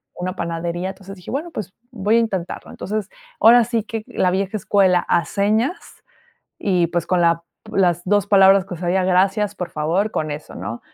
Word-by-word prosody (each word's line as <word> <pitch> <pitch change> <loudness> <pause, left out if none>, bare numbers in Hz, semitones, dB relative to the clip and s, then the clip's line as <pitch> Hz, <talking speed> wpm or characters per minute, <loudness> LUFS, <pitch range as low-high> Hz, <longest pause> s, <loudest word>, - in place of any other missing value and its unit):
una 180 +1 -4
panadería, 170 +2 -3
entonces 195 0 -10
dije: 180 - -12
"Bueno, 310 +6 -3
pues 195 - -6 0.2
voy 210 -2 +1
a - - +5
intentarlo". 190 -6 -3
Entonces, 210 0 -4 0.3
ahora 235 +1 +7
sí 230 -2 -1
que 225 -1 -5
la 180 - 0
vieja 195 +2 -1
escuela 190 -2 +3
a 170 - +2
señas 215 - 0 0.8
y, 180 -4 +1
pues, 175 0 -2
con 180 -2 +1
la 170 0 +2 0.3
las 175 -3 +1
2 205 +1 +2
palabras 195 -2 +6
que 180 - -7
sabía: 180 +2 0
"Gracias", 195 +3 +2
"por 180 -3 -5
favor", 170 +8 0
con 155 -6 -2
eso, 150 +1 -7
¿no? 115 +1 -6
190 Hz, 180 wpm, -20 LUFS, 175-210 Hz, 0.8 s, ahora